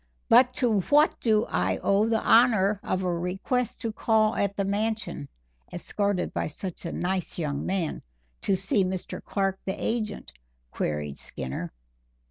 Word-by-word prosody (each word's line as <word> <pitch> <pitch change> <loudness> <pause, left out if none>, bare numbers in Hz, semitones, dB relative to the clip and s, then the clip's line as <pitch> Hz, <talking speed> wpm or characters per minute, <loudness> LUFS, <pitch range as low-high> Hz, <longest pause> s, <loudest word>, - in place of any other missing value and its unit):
"But 255 0 +7
to 235 -6 +2
what 295 - +3
do 220 -2 +2
I 90 +1 0
owe 205 +3 +2
the 225 -1 +1
honor 215 -4 +4
of 185 0 -2
a 180 -1 0
request 190 +8 -2
to 225 - -2
call 220 0 +2
at 200 0 -1
the 200 - 0
Mansion, 210 -7 -2 0.4
escorted 200 +1 -2
by - - -1
such 175 +4 -5
a - - -4
nice 185 0 -2
young 145 -4 -2
man, 185 -4 -1 0.4
to 195 - +2
see 190 +1 +1
Mr. 185 0 -4
Clark, 195 -1 -1
the 190 - -3
agent?" 215 -3 -3 0.4
queried 75 -2 -3
Skinner. 65 +6 -6
195 Hz, 150 wpm, -27 LUFS, 180-220 Hz, 0.4 s, But